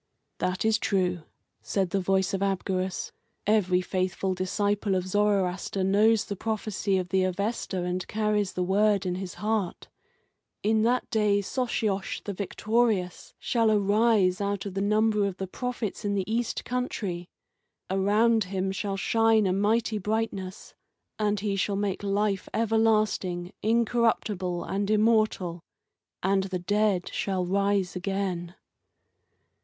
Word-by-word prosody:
"That 185 +3 -1
is 220 -1 +3
true," 180 -5 0 0.4
said 190 -3 -1
the 195 - +1
voice 190 +1 +1
of 195 - -1
Abgarus; 190 -1 -1 0.3
"every 185 -4 +3
faithful 185 +1 -1
disciple 200 +2 0
of 185 -1 -1
Zoroaster 195 -1 0
knows 210 +3 +3
the 200 - -4
prophecy 210 -2 -1
of 180 -1 -2
the 190 0 +2
Avesta, 190 0 -2
and 180 0 -2
carries 210 -2 0
the 180 - -1
word 200 +1 +2
in 180 - 0
his 185 -1 -5
heart. 210 -1 -2 0.7
'In 220 +1 +3
that 245 +3 +1
day 210 -2 +3
Sosiosh 210 -3 -2
the 205 - -4
Victorious 205 -1 -1
shall 230 -2 +1
arise 205 -2 +3
out 200 0 -2
of 200 - -5
the 195 - -2
number 210 0 +2
of 190 -2 -5
the 190 - -3
prophets 235 +1 -4
in 205 -1 0
the 195 -2 0
east 230 +1 -2
country. 200 -8 -3 0.6
Around 210 +3 +3
him 190 0 -2
shall 195 0 -3
shine 225 +2 +3
a 185 - +2
mighty 215 +2 +1
brightness, 205 -2 -3 0.5
and 210 -1 +1
he 205 -1 -1
shall 195 +1 0
make 195 -1 -1
life 200 -1 0
everlasting, 215 -5 +1
incorruptible, 220 -5 +1
and 200 +1 -2
immortal, 215 -5 +2 0.6
and 195 +1 +2
the 190 -1 -3
dead 200 0 +1
shall 190 -2 -1
rise 200 0 +1
again. 185 -2 -3
200 Hz, 135 wpm, -27 LUFS, 185-215 Hz, 0.7 s, is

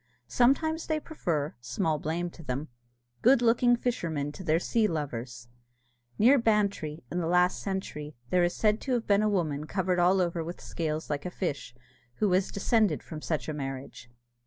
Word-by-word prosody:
Sometimes 280 - +2
they 315 -1 0
prefer, 165 - -2
small 135 +6 -1
blame 170 +3 -2
to 170 - -13
them, 140 0 -4 0.5
good 245 0 +5
looking 240 +1 +4
fishermen 165 - -2
to 190 - -9
their 160 -2 +2
sea 220 +4 +1
lovers. 125 - -4 0.7
Near 260 +6 +6
Bantry, 200 - 0
in 175 - -1
the 165 - -1
last 180 +1 +3
century, 155 -6 -4 0.2
there 180 -1 +4
is 175 - +1
said 215 0 +2
to 265 - -2
have 235 -2 0
been 200 0 +3
a 215 - +2
woman 155 -7 -1
covered 185 -1 0
all 180 +2 +4
over 170 -2 0
with 170 +2 -7
scales 155 -1 -3
like 145 +3 -2
a - - -3
fish, 145 -9 -4 0.4
who 215 - +1
was 185 +1 +2
descended 215 +1 +1
from 155 -2 -8
such 155 -1 -2
a 155 - -2
marriage. 135 -4 -6
175 Hz, 180 wpm, -29 LUFS, 150-210 Hz, 0.7 s, Near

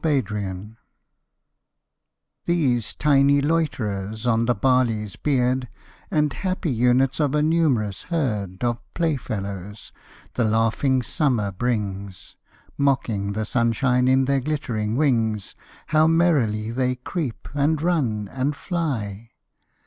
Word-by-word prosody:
Insects 105 - -2 1.7
These 135 -10 +1
tiny 140 -1 +4
loiterers 110 -9 -1
on 115 -1 +2
the 120 0 +2
barley's 115 -4 +1
beard, 130 -2 0 0.4
And 150 -2 +1
happy 185 -4 -2
units 125 +3 +2
of 150 -2 +1
a 150 - +2
numerous 140 - +1
herd 105 - -2
Of 120 -1 0 0.2
playfellows, 105 - -3 0.4
the 120 - 0
laughing 115 +4 +2
Summer 115 -7 0
brings, 100 -3 -3 0.4
Mocking 115 -8 0
the 110 +1 -2
sunshine 125 +2 +1
in 130 +1 +4
their 140 +1 +2
glittering 120 -7 -2
wings, 115 -7 +1 0.3
How 155 0 +3
merrily 135 -11 +2
they 125 +1 0
creep, 125 0 -5
and 145 +2 +1
run, 135 - 0
and 135 +6 -2
fly! 115 - -3
125 Hz, 110 wpm, -23 LUFS, 105-145 Hz, 1.7 s, tiny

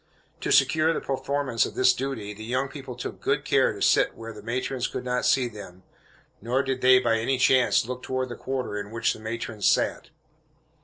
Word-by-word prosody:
To - - -3
secure 160 +1 +4
the - - -2
performance 135 -2 -1
of - - -4
this 130 0 +5
duty, 120 -6 -4
the 110 +1 -10
young 130 +4 -1
people 135 -3 -8
took 125 - -7
good - - 0
care - - +3
to - - -5
sit - - +3
where 115 0 -8
the 105 - -11
matrons 125 +3 -2
could 125 - -6
not 125 0 0
see 130 -2 +3
them, 100 -5 -11 0.6
nor 125 +5 0
did 135 -1 -3
they, 130 0 +7
by 115 -3 +2
any 130 +4 0
chance, 130 -2 +3
look 125 +1 -5
toward 130 0 -3
the 120 - -6
quarter 130 -6 -4
in 100 0 -7
which 115 +1 0
the - - -11
matrons 110 -1 -3
sat. - - +1
125 Hz, 205 wpm, -26 LUFS, 115-130 Hz, 0.6 s, they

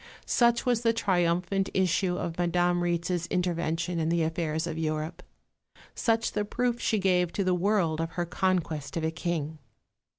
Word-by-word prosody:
Such 235 0 +3
was 245 -2 +2
the 230 -1 +3
triumphant 185 -2 +1
issue 185 0 +1
of 165 - -3
Madame 175 0 +2
Rietz's 175 0 -1
intervention 170 -1 -1
in 160 0 0
the 170 -1 +2
affairs 160 -1 -1
of 170 - -4
Europe; 155 +1 -2 0.7
such 230 -1 +1
the 210 - -1
proof 240 +3 -1
she 220 - +1
gave 180 -3 +2
to 200 - 0
the 185 -1 +2
world 180 -4 +1
of 165 0 -4
her 175 -1 -1
conquest 170 -4 -1
of 165 - -2
a 160 - 0
King. 160 -2 -3
175 Hz, 165 wpm, -28 LUFS, 165-190 Hz, 0.7 s, Such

